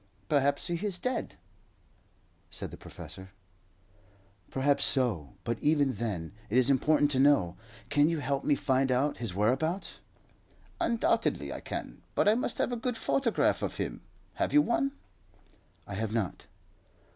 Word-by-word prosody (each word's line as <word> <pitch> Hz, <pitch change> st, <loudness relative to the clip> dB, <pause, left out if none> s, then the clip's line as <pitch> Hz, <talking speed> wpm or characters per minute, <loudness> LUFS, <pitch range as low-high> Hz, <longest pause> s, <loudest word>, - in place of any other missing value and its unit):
"Perhaps 140 Hz, -1 st, +2 dB
he 170 Hz, +1 st, -3 dB
is 200 Hz, -4 st, -1 dB
dead," 255 Hz, +4 st, -3 dB, 1.1 s
said -, -, -5 dB
the -, -, -7 dB
professor. 95 Hz, 0 st, -10 dB, 1.2 s
"Perhaps 140 Hz, +1 st, +2 dB
so; 110 Hz, -, +1 dB
but 115 Hz, -1 st, -2 dB
even 145 Hz, -3 st, +2 dB
then 100 Hz, -10 st, -3 dB, 0.2 s
it 115 Hz, -, +1 dB
is 130 Hz, +2 st, +5 dB
important 145 Hz, +2 st, +3 dB
to 130 Hz, -, +1 dB
know. 135 Hz, -12 st, +4 dB, 0.3 s
Can 145 Hz, +2 st, +4 dB
you 165 Hz, -, 0 dB
help 140 Hz, -1 st, -1 dB
me 145 Hz, -, +3 dB
to -, -, -9 dB
find 135 Hz, -1 st, +2 dB
out 135 Hz, +4 st, +1 dB
his 115 Hz, -7 st, -4 dB
whereabouts?" 135 Hz, -, 0 dB, 0.8 s
"Undoubtedly 230 Hz, -1 st, +1 dB
I -, -, -5 dB
can; -, -, -6 dB
but -, -, +3 dB
I 210 Hz, -, +7 dB
must 245 Hz, -, -2 dB
have -, -, 0 dB
a -, -, 0 dB
good 250 Hz, -3 st, -1 dB
photograph 240 Hz, +1 st, +1 dB
of -, -, -3 dB
him. -, -, -3 dB, 0.4 s
Have -, -, +1 dB
you 295 Hz, 0 st, +7 dB
one?" 275 Hz, +3 st, +1 dB, 0.9 s
"I 100 Hz, -, -7 dB
have 110 Hz, +2 st, -2 dB
not." 110 Hz, -5 st, -2 dB
140 Hz, 155 wpm, -30 LUFS, 115-170 Hz, 1.2 s, I